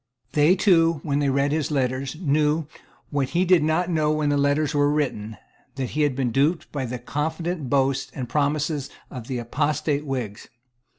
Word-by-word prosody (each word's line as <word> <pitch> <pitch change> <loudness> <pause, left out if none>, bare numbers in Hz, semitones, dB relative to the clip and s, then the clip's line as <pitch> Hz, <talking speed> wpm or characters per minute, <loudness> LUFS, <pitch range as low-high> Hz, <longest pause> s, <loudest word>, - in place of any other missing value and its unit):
They 150 +6 +4
too, 165 -5 +3
when 145 -2 0
they 145 -1 +1
read 140 +1 +1
his 155 0 0
letters, 130 -1 -1
knew, 150 -1 +1 0.5
what 140 -3 0
he 185 - +3
did 180 -2 +5
not 160 +3 +1
know 155 -2 +2
when 155 -1 +1
the 145 - +2
letters 145 +1 +1
were 145 0 +3
written, 120 -8 -2 0.4
that 130 -2 -3
he 150 - -1
had 145 -3 +2
been 130 -3 0
duped 145 +7 +1
by 140 -3 -3
the 125 +1 -4
confident 155 +4 -3
boasts 135 0 +1
and 130 -3 -4
promises 145 +1 0 0.2
of 125 -3 -8
the 130 - -3
apostate 145 +4 -1
Whigs. 125 -8 -4
145 Hz, 180 wpm, -24 LUFS, 135-155 Hz, 0.5 s, did